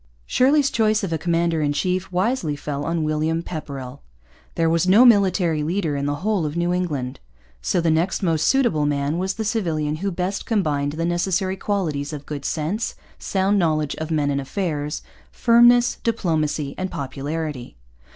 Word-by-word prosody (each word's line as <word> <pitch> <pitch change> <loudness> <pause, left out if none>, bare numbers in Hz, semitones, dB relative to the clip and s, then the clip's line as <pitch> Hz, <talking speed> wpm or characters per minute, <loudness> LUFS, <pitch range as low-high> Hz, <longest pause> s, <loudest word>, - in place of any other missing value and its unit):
Shirley's 280 +2 +3
choice 215 -2 +2
of 180 -4 -2
a 160 - -1
commander 170 -1 +1
in 145 -1 +1
chief 185 +4 -1
wisely 185 - 0
fell 145 0 -4
on 165 -1 -1
William 155 +2 0
Pepperrell. 140 -5 -7 0.5
There 165 - +2
was 165 +2 +2
no 210 +7 +7
military 185 -8 +4
leader 165 -1 -1
in 140 0 -2
the 145 - 0
whole 210 -5 +1
of 150 +2 -3
New 175 +1 +1
England. 145 -9 -2 0.4
So - - 0
the 165 -1 +2
next 170 +5 0
most 160 -3 +1
suitable 235 - +2
man 145 +3 -1
was 190 +1 -1
the 220 - -3
civilian 160 -9 -1
who 195 +5 -2
best 185 +2 -3
combined 145 -10 0
the 165 +2 -2
necessary 185 +2 0
qualities 165 -8 -2
of 145 -1 -7
good 145 -2 -6
sense, 175 +8 -2 0.2
sound 195 +1 +1
knowledge 155 -4 +1
of 160 0 -4
men 150 -3 +1
and 140 0 -1
affairs, 150 -1 -3 0.3
firmness, 240 0 +5
diplomacy, 155 - -1
and 185 0 -2
popularity. 140 - -5
165 Hz, 170 wpm, -22 LUFS, 150-195 Hz, 0.5 s, no